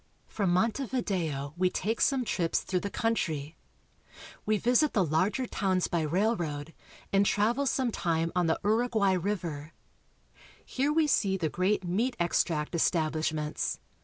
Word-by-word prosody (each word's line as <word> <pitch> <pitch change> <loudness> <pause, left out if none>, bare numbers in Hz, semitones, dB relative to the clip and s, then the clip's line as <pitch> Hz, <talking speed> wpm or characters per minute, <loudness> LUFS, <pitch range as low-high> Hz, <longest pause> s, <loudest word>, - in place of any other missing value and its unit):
From 200 -4 -1
Montevideo 185 - -1
we 180 +1 +2
take 220 +5 -2
some 265 -3 +2
trips 170 -6 0
through 185 - -1
the 200 - -4
country. 160 -10 -2 0.9
We 215 0 +3
visit 250 +7 +2
the 195 -5 +3
larger 185 - +1
towns 190 -5 0
by 170 - 0
railroad 165 -3 -1 0.4
and 195 0 +5
travel 230 +8 +1
some 255 -2 +1
time 165 -4 -1
on 180 -2 +2
the 160 - +1
Uruguay 220 -2 +2
river. 170 -5 -3 0.9
Here 275 +3 0
we 315 +1 +3
see 200 -9 +2
the 165 -4 -1
great 190 +5 0
meat 220 +9 0
extract 165 -2 0
establishments. 155 -2 0
185 Hz, 135 wpm, -29 LUFS, 165-225 Hz, 0.9 s, and